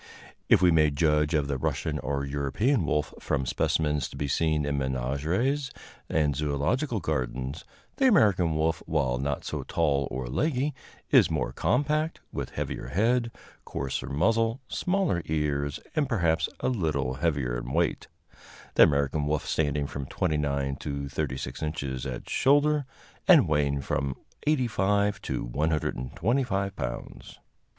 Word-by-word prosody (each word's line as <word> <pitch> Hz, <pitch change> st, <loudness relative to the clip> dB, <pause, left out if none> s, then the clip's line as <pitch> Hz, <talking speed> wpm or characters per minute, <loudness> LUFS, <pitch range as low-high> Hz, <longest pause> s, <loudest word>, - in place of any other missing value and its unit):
If -, -, +6 dB
we 90 Hz, -, +6 dB
may 80 Hz, -2 st, +5 dB
judge 75 Hz, +1 st, +2 dB
of 75 Hz, -2 st, +1 dB
the 70 Hz, -2 st, -2 dB
Russian -, -, -1 dB
or 70 Hz, +1 st, -2 dB
European 75 Hz, -, 0 dB
wolf 75 Hz, 0 st, 0 dB
from 65 Hz, -, -1 dB
specimens 75 Hz, +3 st, 0 dB
to -, -, -10 dB
be 70 Hz, -, -2 dB
seen 75 Hz, +1 st, +1 dB
in 70 Hz, -1 st, -1 dB
menageries 75 Hz, -, -1 dB, 0.4 s
and 75 Hz, -2 st, +2 dB
zoölogical 75 Hz, -, 0 dB
gardens, 65 Hz, -2 st, -3 dB, 0.3 s
the 270 Hz, -, +4 dB
American 95 Hz, -, +4 dB
wolf, 80 Hz, +1 st, 0 dB
while 65 Hz, -6 st, 0 dB
not 70 Hz, +1 st, -2 dB
so -, -, -3 dB
tall 70 Hz, -5 st, 0 dB
or 65 Hz, 0 st, -4 dB
leggy, 135 Hz, -, 0 dB, 0.4 s
is -, -, +6 dB
more -, -, -1 dB
compact, 150 Hz, +5 st, 0 dB
with -, -, -3 dB
heavier -, -, -4 dB
head, 115 Hz, -, +1 dB, 0.3 s
coarser 70 Hz, -2 st, -4 dB
muzzle, 115 Hz, -, +1 dB
smaller 180 Hz, -, 0 dB
ears, 70 Hz, -2 st, -1 dB, 0.2 s
and 150 Hz, -3 st, +1 dB
perhaps 85 Hz, -8 st, +1 dB
a -, -, 0 dB
little 75 Hz, -, 0 dB
heavier 70 Hz, -7 st, 0 dB
in -, -, -4 dB
weight -, -, 0 dB, 0.7 s
the -, -, +4 dB
American 70 Hz, +1 st, +4 dB
wolf 75 Hz, 0 st, 0 dB
standing 75 Hz, -2 st, 0 dB
from 70 Hz, -1 st, -5 dB
29 70 Hz, -2 st, -1 dB
to 70 Hz, -1 st, -4 dB
36 65 Hz, -1 st, -4 dB
inches 70 Hz, -5 st, -3 dB
at 65 Hz, -2 st, -6 dB
shoulder, 145 Hz, 0 st, +3 dB, 0.4 s
and -, -, +7 dB
weighing 70 Hz, -2 st, +1 dB
from 70 Hz, -1 st, -2 dB, 0.3 s
85 105 Hz, -8 st, +2 dB
to -, -, -3 dB
125 90 Hz, -, -1 dB
pounds. -, -, -6 dB
75 Hz, 140 wpm, -27 LUFS, 70-100 Hz, 0.7 s, and